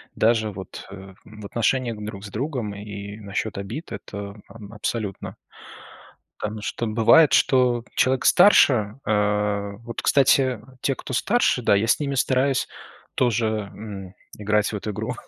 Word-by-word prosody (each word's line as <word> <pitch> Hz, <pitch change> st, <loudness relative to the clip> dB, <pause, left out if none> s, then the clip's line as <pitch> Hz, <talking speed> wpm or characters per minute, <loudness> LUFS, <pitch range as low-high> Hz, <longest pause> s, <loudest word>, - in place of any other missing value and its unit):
Даже 110 Hz, -1 st, +2 dB
вот 95 Hz, -2 st, -9 dB, 0.4 s
в 105 Hz, -1 st, -12 dB
отношениях 120 Hz, +2 st, 0 dB
друг 105 Hz, -1 st, -7 dB
с -, -, -8 dB
другом 120 Hz, -2 st, -3 dB
и 100 Hz, 0 st, -8 dB
насчёт 100 Hz, +1 st, -4 dB
обид 110 Hz, -, -6 dB
это 100 Hz, 0 st, -7 dB, 0.4 s
абсолютно. 105 Hz, -2 st, -4 dB, 1.0 s
Потому 105 Hz, 0 st, -4 dB
что 115 Hz, -, -3 dB
бывает, 120 Hz, +8 st, +5 dB
что 125 Hz, -3 st, +3 dB
человек 130 Hz, 0 st, +2 dB
старше, 130 Hz, -, +5 dB
э, 105 Hz, -1 st, 0 dB
вот, 115 Hz, 0 st, -6 dB
кстати, 135 Hz, -3 st, +3 dB, 0.2 s
те, 135 Hz, -, 0 dB
кто 130 Hz, -, -8 dB
старше, 200 Hz, -, +2 dB
да, 105 Hz, -, +3 dB
я 105 Hz, +3 st, +1 dB
с -, -, +3 dB
ними 140 Hz, -2 st, -2 dB
стараюсь 130 Hz, +1 st, +1 dB, 0.5 s
тоже, 120 Hz, -2 st, +1 dB, 0.3 s
м, 100 Hz, -3 st, -8 dB, 0.2 s
играть 105 Hz, 0 st, +1 dB
в -, -, -4 dB
эту 105 Hz, +1 st, -4 dB
игру, 100 Hz, -, -4 dB
110 Hz, 140 wpm, -23 LUFS, 105-130 Hz, 1.0 s, бывает